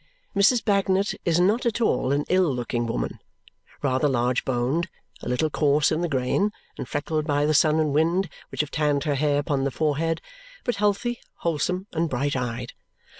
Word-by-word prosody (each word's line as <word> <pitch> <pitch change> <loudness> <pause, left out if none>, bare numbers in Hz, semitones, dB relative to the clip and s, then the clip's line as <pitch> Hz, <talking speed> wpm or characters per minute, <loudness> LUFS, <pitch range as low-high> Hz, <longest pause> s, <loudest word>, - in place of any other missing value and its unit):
Mrs. 215 +4 +4
Bagnet 200 -1 +2
is 170 -1 +3
not 205 +7 +3
at 235 -1 0
all 220 - +1
an 145 +1 +1
ill 185 -4 +3
looking 120 -1 -2
woman. - - -3 0.6
Rather 130 +1 +2
large 125 -1 +1
boned, 130 +7 0 0.3
a - - -5
little 150 +5 0
coarse 145 0 +3
in 155 - 0
the 175 - -1
grain, 140 +10 +1 0.2
and - - -6
freckled 155 +1 -2
by 145 0 +2
the 155 - +2
sun 155 +1 +4
and 155 -3 +1
wind 170 +5 +2 0.2
which - - -1
have 150 - -6
tanned 145 -2 +1
her 150 -2 0
hair 145 +1 +1
upon 145 -2 0
the 140 - +1
forehead, 160 +3 0 0.4
but 245 - -1
healthy, 210 +4 0 0.2
wholesome, 180 +3 -1
and 165 0 0
bright 140 +2 -1
eyed. 125 -1 -3
150 Hz, 180 wpm, -25 LUFS, 135-180 Hz, 0.6 s, Mrs